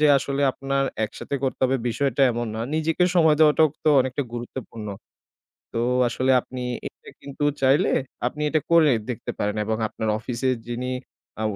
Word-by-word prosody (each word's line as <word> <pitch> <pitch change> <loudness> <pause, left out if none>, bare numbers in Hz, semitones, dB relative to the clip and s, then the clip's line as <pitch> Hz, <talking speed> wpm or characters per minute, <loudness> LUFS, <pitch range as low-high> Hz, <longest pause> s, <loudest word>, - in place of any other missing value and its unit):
যে 150 - +5
আসলে 140 +1 -2
আপনার 135 +1 -1 0.2
একসাথে 110 - -6
করতে 130 - -2
হবে 130 +1 +2
বিষয়টা 135 +2 0
এমন 120 +1 -2
না 110 - -4
নিজেকে 160 +3 +1
সময় 160 -4 +5
দেওয়াটাও 155 0 +6 0.2
তো - - +4
অনেকটা 130 +2 -1
গুরুত্বপূর্ণ। 120 -2 -7 0.9
তো 115 - -1 0.3
আসলে 130 +2 0
আপনি 130 +1 -8 0.3
এটা - - -10
কিন্তু 140 +1 -5 0.2
চাইলে, 135 +3 +4 0.4
আপনি 150 +5 -3
এটা 155 0 +1
কইরে 165 -4 +5 0.2
দেখতে 115 - -5
পারেন 105 +1 -1
এবং 110 +1 -1
আপনার 110 - -4
অফিসের 125 +3 -1
যিনি, 125 +2 -3 0.5
আ - - -1
130 Hz, 160 wpm, -24 LUFS, 120-150 Hz, 0.9 s, দেওয়াটাও